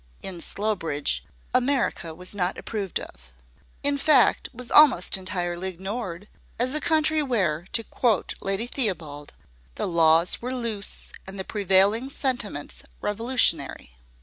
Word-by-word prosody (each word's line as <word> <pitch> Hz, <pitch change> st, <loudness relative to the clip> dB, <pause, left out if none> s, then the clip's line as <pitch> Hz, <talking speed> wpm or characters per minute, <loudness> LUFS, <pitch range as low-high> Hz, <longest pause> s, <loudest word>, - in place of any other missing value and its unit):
In 180 Hz, -3 st, -4 dB
Slowbridge, 180 Hz, -10 st, -1 dB, 0.3 s
America 250 Hz, -, 0 dB
was 180 Hz, +3 st, -5 dB
not 185 Hz, -2 st, -1 dB
approved 205 Hz, -5 st, -3 dB
of -, -, -12 dB, 0.5 s
in 285 Hz, 0 st, +1 dB
fact, 275 Hz, -4 st, +4 dB
was 245 Hz, 0 st, -10 dB
almost 270 Hz, -, +6 dB
entirely 185 Hz, -1 st, -3 dB
ignored, 190 Hz, 0 st, -6 dB, 0.3 s
as 250 Hz, +3 st, 0 dB
a 305 Hz, -, +1 dB
country 315 Hz, -1 st, +2 dB
where, 185 Hz, -, 0 dB
to 230 Hz, -, +1 dB
quote 225 Hz, -3 st, 0 dB
Lady 195 Hz, +3 st, -1 dB
Theobald, 170 Hz, -, -3 dB, 0.4 s
"the -, -, -2 dB
laws 165 Hz, 0 st, +4 dB
were 250 Hz, +2 st, -3 dB
loose, 225 Hz, -5 st, -3 dB, 0.2 s
and 195 Hz, +1 st, -7 dB
the 190 Hz, -, -2 dB
prevailing 205 Hz, +5 st, +3 dB
sentiments 245 Hz, -, -3 dB, 0.2 s
revolutionary." 225 Hz, -, +1 dB
200 Hz, 125 wpm, -25 LUFS, 175-245 Hz, 0.5 s, almost